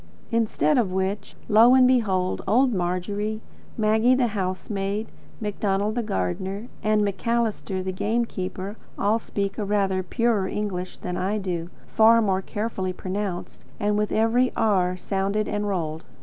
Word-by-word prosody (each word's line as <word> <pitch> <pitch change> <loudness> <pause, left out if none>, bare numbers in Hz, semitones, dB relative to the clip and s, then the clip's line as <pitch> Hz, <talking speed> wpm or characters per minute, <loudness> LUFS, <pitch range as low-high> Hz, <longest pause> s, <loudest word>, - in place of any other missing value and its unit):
Instead 230 +4 +2
of 205 -6 +1
which, 190 +2 -2
lo! 230 +4 +7
and 255 -1 +6
behold, 195 -8 +1
old 250 +2 +4
Margery, 200 +4 -2 0.4
Maggie 220 +3 +4
the 250 -2 +2
housemaid, 195 +1 -2 0.3
Macdonald 205 -1 -1
the 240 - -1
gardener, 190 - -3
and 215 0 +2
Macalister 205 -1 -1
the 190 - -2
game 225 +5 0
keeper, 190 0 -5 0.2
all 215 +3 +2
speak 200 -2 -3
a - - 0
rather 195 -2 +1
purer 215 0 +1
English 190 -3 -3
than 180 0 -4
I 195 +4 0
do; 175 -4 -3 0.2
far 225 +1 +5
more 195 -4 +1
carefully 195 -2 -3
pronounced, 190 0 -4 0.2
and 205 0 +1
with 210 0 0
every 235 +3 +3
R 185 -4 +2
sounded 200 +3 -1
and 205 0 -2
rolled. 165 -5 -2
205 Hz, 145 wpm, -25 LUFS, 185-220 Hz, 0.4 s, lo